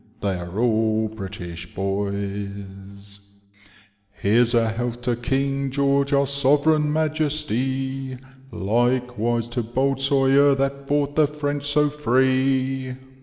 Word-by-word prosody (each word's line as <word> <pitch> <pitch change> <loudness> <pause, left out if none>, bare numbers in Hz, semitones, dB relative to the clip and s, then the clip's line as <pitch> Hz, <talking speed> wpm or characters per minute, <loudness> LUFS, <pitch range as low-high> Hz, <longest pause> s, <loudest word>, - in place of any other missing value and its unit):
They 100 -1 0
are 85 +2 -7
all 110 -2 +1
British 90 -5 -8
boys. 100 +1 -1
*• 100 0 -7 0.9
Here's 115 +4 +3
a 115 -1 +3
health 120 +1 -4
to 120 0 0 0.2
Ring 135 0 0
George 140 +1 +1
our 140 0 +3
Sovereign 145 +2 +3
Majesty, 135 -4 -1 0.3
Likewise 120 +2 0
to 120 +1 -2
bold 130 +4 -1
Sawyer, 135 +1 +4
that 135 0 -2
fought 145 0 0
the 155 -1 +4
French 145 -1 -3
so 150 0 +3
free. 130 -1 0
130 Hz, 115 wpm, -23 LUFS, 110-140 Hz, 0.9 s, Sawyer